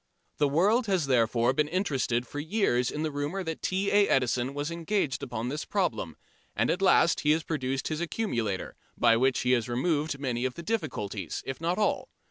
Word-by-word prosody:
The 145 Hz, -, +3 dB
world 205 Hz, -, +2 dB
has 185 Hz, -6 st, +1 dB
therefore 120 Hz, -1 st, +2 dB
been 150 Hz, +2 st, +1 dB
interested 140 Hz, -9 st, 0 dB
for 145 Hz, -, -6 dB
years 155 Hz, -, +1 dB
in 150 Hz, -, -3 dB
the 155 Hz, -, -1 dB
rumour 145 Hz, +7 st, -3 dB
that 160 Hz, -2 st, -5 dB
T. 195 Hz, +2 st, 0 dB
A. 205 Hz, 0 st, +5 dB
Edison 125 Hz, +1 st, +1 dB
was 145 Hz, +3 st, -3 dB
engaged 170 Hz, -3 st, -1 dB
upon 120 Hz, -2 st, -4 dB
this 150 Hz, +4 st, -3 dB
problem, 175 Hz, -, -2 dB, 0.4 s
and -, -, +2 dB
at 180 Hz, -, -2 dB
last 190 Hz, -3 st, +4 dB
he 150 Hz, -, 0 dB
has 160 Hz, 0 st, -1 dB
produced 135 Hz, -5 st, -2 dB
his 155 Hz, +1 st, -3 dB
accumulator, 120 Hz, -, -2 dB, 0.2 s
by 115 Hz, -, +5 dB
which 130 Hz, +3 st, +2 dB
he 125 Hz, -, +1 dB
has 120 Hz, -2 st, +1 dB
removed 145 Hz, +4 st, 0 dB
many 125 Hz, -3 st, -2 dB
of 130 Hz, -1 st, -1 dB
the 170 Hz, -, -7 dB
difficulties, 105 Hz, -, -3 dB
if 135 Hz, +3 st, -5 dB
not 170 Hz, +2 st, 0 dB
all. 210 Hz, -, 0 dB
145 Hz, 195 wpm, -28 LUFS, 125-175 Hz, 0.4 s, A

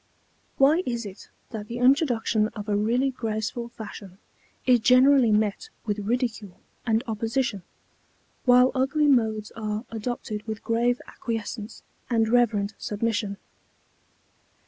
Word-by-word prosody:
Why 295 Hz, +6 st, +5 dB
is 235 Hz, -5 st, -3 dB
it 195 Hz, 0 st, -10 dB, 0.2 s
that 215 Hz, -3 st, -6 dB
the 235 Hz, -, -5 dB
introduction 245 Hz, -5 st, +3 dB
of 210 Hz, -1 st, -6 dB
a 205 Hz, -, +1 dB
really 240 Hz, +6 st, +1 dB
graceful 225 Hz, 0 st, -3 dB
fashion 205 Hz, -4 st, -10 dB, 0.5 s
is 250 Hz, -2 st, +5 dB
generally 255 Hz, +1 st, +5 dB
met 215 Hz, -, 0 dB, 0.2 s
with 210 Hz, -1 st, -1 dB
ridicule 220 Hz, -3 st, -2 dB, 0.3 s
and 225 Hz, +1 st, +2 dB
opposition, 225 Hz, -1 st, -1 dB, 0.8 s
while 250 Hz, 0 st, +6 dB
ugly 275 Hz, +3 st, +1 dB
modes 220 Hz, -6 st, +2 dB
are 215 Hz, +1 st, -4 dB
adopted 225 Hz, -1 st, -4 dB
with 220 Hz, 0 st, -5 dB
grave 240 Hz, +2 st, +1 dB
acquiescence 225 Hz, -2 st, -5 dB, 0.3 s
and 225 Hz, -2 st, +2 dB
reverent 220 Hz, -3 st, +2 dB
submission? 210 Hz, -1 st, -2 dB
230 Hz, 120 wpm, -25 LUFS, 215-250 Hz, 0.8 s, while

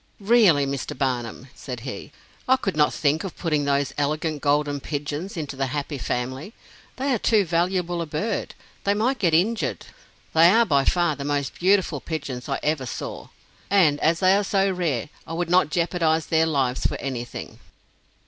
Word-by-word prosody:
"Really, 200 Hz, -9 st, +4 dB
Mr. 135 Hz, -2 st, -4 dB
Barnum," 125 Hz, -1 st, -2 dB
said 125 Hz, -4 st, -7 dB
he, 130 Hz, +3 st, -7 dB, 0.4 s
"I 260 Hz, -, +6 dB
could 195 Hz, -8 st, -3 dB
not 150 Hz, -1 st, +3 dB
think 150 Hz, +1 st, 0 dB
of 195 Hz, -, -7 dB
putting 150 Hz, -4 st, 0 dB
those 140 Hz, -1 st, 0 dB
elegant 150 Hz, +1 st, -1 dB
golden 145 Hz, 0 st, +1 dB
pigeons 145 Hz, +6 st, -4 dB
into 145 Hz, -3 st, -4 dB
the 135 Hz, 0 st, -1 dB
Happy 145 Hz, +1 st, -4 dB
Family 130 Hz, -, -4 dB, 0.4 s
they 270 Hz, +1 st, 0 dB
are 235 Hz, -, 0 dB
too 210 Hz, -2 st, +3 dB
valuable 175 Hz, +1 st, 0 dB
a 165 Hz, -, -4 dB
bird 180 Hz, +9 st, -3 dB, 0.3 s
they 200 Hz, 0 st, +2 dB
might 245 Hz, +5 st, 0 dB
get 170 Hz, -5 st, +3 dB
injured 215 Hz, +7 st, 0 dB, 0.5 s
they 165 Hz, +1 st, +7 dB
are 230 Hz, +5 st, +5 dB
by 140 Hz, -7 st, +2 dB
far 175 Hz, -4 st, +2 dB
the 140 Hz, -, -6 dB
most 145 Hz, -1 st, -1 dB
beautiful 185 Hz, -5 st, +2 dB
pigeons 140 Hz, -5 st, -5 dB
I 135 Hz, -, -1 dB
ever 150 Hz, -4 st, 0 dB
saw; -, -, -6 dB, 0.4 s
and 165 Hz, -8 st, +4 dB
as 165 Hz, +2 st, +2 dB
they 185 Hz, +1 st, +5 dB
are 205 Hz, -, +2 dB
so 195 Hz, 0 st, +1 dB
rare, 160 Hz, -9 st, -2 dB, 0.2 s
I 165 Hz, -, -6 dB
would 170 Hz, 0 st, -2 dB
not 180 Hz, -4 st, +4 dB
jeopardize 165 Hz, -1 st, +1 dB
their 160 Hz, 0 st, +2 dB
lives 135 Hz, -5 st, 0 dB
for -, -, 0 dB
anything." 125 Hz, -3 st, -6 dB
155 Hz, 175 wpm, -24 LUFS, 140-185 Hz, 0.5 s, they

